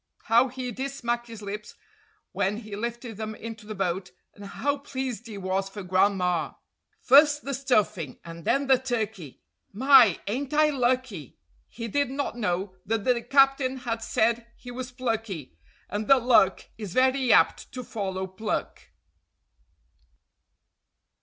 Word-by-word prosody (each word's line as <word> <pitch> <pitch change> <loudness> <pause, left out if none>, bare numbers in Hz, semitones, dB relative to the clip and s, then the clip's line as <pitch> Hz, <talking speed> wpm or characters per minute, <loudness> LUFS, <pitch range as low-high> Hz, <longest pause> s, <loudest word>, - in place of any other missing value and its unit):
How 235 +3 +4
he 255 -1 -5
did 265 +4 -4
smack 240 -3 -3
his 225 -2 -10
lips 210 +1 -7 0.6
when 200 +2 -1
he 215 -3 -8
lifted 235 0 -5
them 215 0 -5
into 220 -1 -9
the 215 - -6
boat, 185 -1 -2 0.2
and 205 - -13
how 285 +8 -2
pleased 260 -4 -5
he 215 -3 -8
was 190 0 -2
for 205 0 -8
grandma! 185 -2 +1 0.5
"First 290 +2 +5
the 275 - -4
stuffing, 215 - 0
and 165 0 -9
then 275 - +1
the 265 -2 +4
turkey! 220 - -4 0.3
My, 240 -4 +6
ain't 265 +8 -3
I 305 0 +4
lucky?" 250 - -1 0.3
He 230 +1 -7
did 285 +3 0
not 275 -2 -3
know 185 -3 -2
that 220 -1 -1
the 245 0 +2
captain 270 0 +3
had 235 -3 -3
said 230 0 0
he 245 - -10
was 250 0 -6
plucky, 225 - -4 0.3
and 205 +2 -4
that 270 -3 +5
luck 225 -6 +4
is 205 -5 -6
very 260 -1 +3
apt 165 - +3
to 255 0 -6
follow 190 -4 -4
pluck. 190 +4 -4
230 Hz, 145 wpm, -26 LUFS, 200-255 Hz, 0.6 s, My